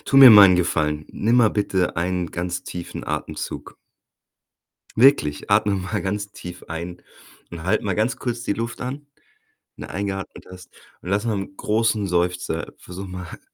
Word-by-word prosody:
Tu 135 - +1
mir 135 -3 +11
mal 100 -3 +10
'n 90 - +4
Gefallen. 75 -3 0
Nimm 115 +4 +1
mal 120 -3 +6
bitte 95 -4 0
einen 90 0 -1
ganz 90 +1 -3
tiefen 85 -1 -7
Atemzug. - - -5 1.2
Wirklich, 115 - +4
atme 100 0 +3
mal 95 +2 -3
ganz 100 +1 -3
tief 90 -2 -9
ein 85 +2 -6 0.5
und 85 -1 -8
halt 95 - +1
mal 100 - -1
ganz 115 +5 0
kurz 120 -2 -4
die 100 - 0
Luft 115 +1 -5
an, 140 +3 -5 0.7
wenn - - -8
du - - -14
eingeatmet 100 -1 -5
hast. 90 -1 -12 0.3
Und 90 - -7
lass 100 +3 0
mal 115 - 0
'n 95 0 -8
großen 110 -1 +1
Seufzer 90 -1 -1
versuche 95 +2 -9
mal, 90 -1 -8
95 Hz, 170 wpm, -22 LUFS, 90-110 Hz, 1.2 s, mir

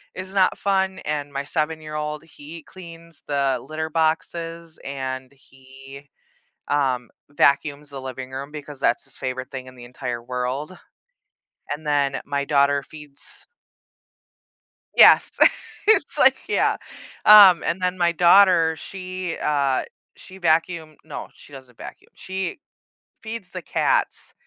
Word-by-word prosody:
is 185 +1 -7
not 190 -2 +3
fun, 190 -1 0
and 145 -1 -3
my 140 0 -3
7 155 +2 -2
year 155 0 -9
old, 150 0 -4
he 155 0 -12
cleans 170 -3 -12
the 140 -3 0
litter 160 0 -3
boxes, 165 +1 -2
and 130 -1 -5
he, 135 +1 -15 0.6
um, 130 -4 0 0.2
vacuums 145 +1 +1
the 140 -1 -7
living 130 0 -7
room 135 +2 -6
because 145 -2 -9
that's 120 - +1
his - - -12
favorite 130 0 -5
thing 130 -2 -7
in 130 - -13
the 120 - -11
entire 120 -1 -6
world, 125 +7 -4 1.0
and 150 +1 -5
then 140 -2 +1
my 140 0 -2
daughter 140 -1 +2
feeds 150 -2 -11 1.5
Yes. - - +7 0.6
It's 410 -9 +4
like 265 -2 +6
yeah, 440 - +1 0.5
um, 200 -4 +9
and 175 +3 -1
then 180 0 -1
my 170 -1 +2
daughter, 175 -1 +5
she, 185 -2 -6
uh, 140 -3 +1 0.3
she 190 - -13
vacuum 165 -2 0
no, - - -7
she 145 - -17
doesn't 130 -3 -13
vacuum, - - -11
she 190 +1 -5 0.6
feeds 220 -4 -7
the - - -6
cats - - -1
150 Hz, 135 wpm, -23 LUFS, 135-170 Hz, 1.5 s, um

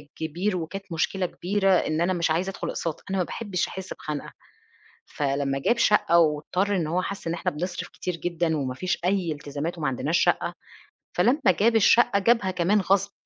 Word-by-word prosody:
كبير، 175 +5 -2
وكانت 195 +4 -5
مشكلة 180 +3 0
كبيرة، 195 +3 0
إن 160 -2 +1
أنا 185 +2 +2
مش 170 -2 0
عايزة 180 +4 0
أدخل - - -5
أقساط، 165 -2 -4
أنا 195 - -1
ما - - +3
باحبش 190 -3 -3
أحس 190 0 -7
بخنقة، 150 -1 -6 0.7
فلمّا 140 -1 -1
جاب 235 - +1
شقة 210 -6 +4
واضطر 170 +6 +1
إن 165 -4 0
هو 175 +3 0
حس 195 -3 -5
إن 165 - -1
إحنا 170 - -1
بنصرف 175 +4 -4
كتير 180 -2 -4
جدًا 170 -2 -1
وما 130 -3 -2
فيش 180 +7 -2
أي 185 -3 +1
التزامات 150 +3 -4
وما 150 -3 -1
عندناش 145 +6 0
شقة. - - +1 0.6
فلمّا 275 +6 +3 0.2
جاب 230 +2 +4
الشقة 225 0 +5
جابها 205 -2 +2
كمان 185 +3 +2
غصب، 195 +2 +1
175 Hz, 180 wpm, -25 LUFS, 160-195 Hz, 0.7 s, الشقة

